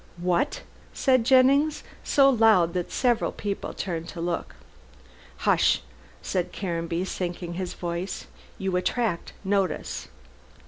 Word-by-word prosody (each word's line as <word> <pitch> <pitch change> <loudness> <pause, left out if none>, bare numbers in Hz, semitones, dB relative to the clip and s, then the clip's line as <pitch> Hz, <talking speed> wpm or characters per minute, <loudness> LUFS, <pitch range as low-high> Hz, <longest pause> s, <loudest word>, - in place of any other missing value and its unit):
"What?" 180 - 0 0.3
said 255 -3 +3
Jennings, 275 +4 +4 0.2
so 275 -1 +5
loud 220 -9 +5
that 180 -1 -3
several 240 -3 +1
people 200 -2 -4
turned 170 -3 -4
to 175 - -8
look. 170 +1 -3 0.9
"Hush!" - - +3 0.4
said 180 -2 -1
Caranby, 170 -1 -2
sinking 175 -2 -4
his 180 +1 -4
voice, 175 +2 -4 0.3
"you 190 -1 -2
attract 205 -1 -1
notice. 195 -1 -1
190 Hz, 110 wpm, -26 LUFS, 175-240 Hz, 0.9 s, so